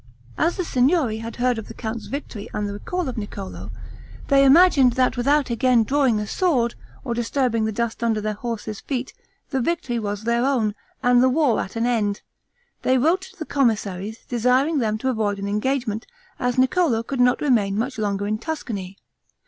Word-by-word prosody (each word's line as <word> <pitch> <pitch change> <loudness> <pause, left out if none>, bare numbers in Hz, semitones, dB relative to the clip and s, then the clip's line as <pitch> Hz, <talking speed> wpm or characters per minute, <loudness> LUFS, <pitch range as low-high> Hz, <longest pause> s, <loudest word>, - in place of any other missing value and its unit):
As 345 - +1
the 365 - -1
Signory 255 -4 +2
had 230 +1 -6
heard 245 -1 +1
of 220 - -8
the - - -10
count's 220 -1 -5
victory 255 -7 -6
and 210 -1 -1
the 200 - -4
recall 355 - -3
of 250 -3 -3
Niccolo, 200 -2 -7 0.6
they 275 -1 +6
imagined 275 -3 +6
that 255 +1 +2
without 275 +1 +2
again 240 0 +3
drawing 265 -2 +2
a 210 - -2
sword 245 - +1 0.3
or 240 - -2
disturbing 235 -1 0
the 220 - -1
dust 235 +1 -3
under 225 -2 +1
their 215 0 -2
horses' 215 -1 -5
feet, 260 -2 -4 0.4
the 265 -2 0
victory 245 -5 -1
was 205 -1 -4
their 235 +1 +1
own, 245 -6 +1 0.3
and 245 -1 +5
the 260 - +5
war 270 -4 +2
at 190 - -5
an 230 +1 0
end, 215 -4 0 0.6
they 260 - +3
wrote 325 +9 +2
to 380 - -13
the 315 - -5
commissaries, 215 -6 -1
desiring 255 +6 +2
them 215 -3 0
to 260 - -3
avoid 215 -4 0
an 200 0 -4
engagement, 220 +1 -1 0.3
as 245 -1 -1
Niccolo 260 -2 +2
could 265 +2 -4
not 245 0 +4
remain 215 -8 +2
much 250 +2 -2
longer 205 -1 -1
in 215 +1 -1
Tuscany. 215 - -5
240 Hz, 190 wpm, -23 LUFS, 215-270 Hz, 0.6 s, they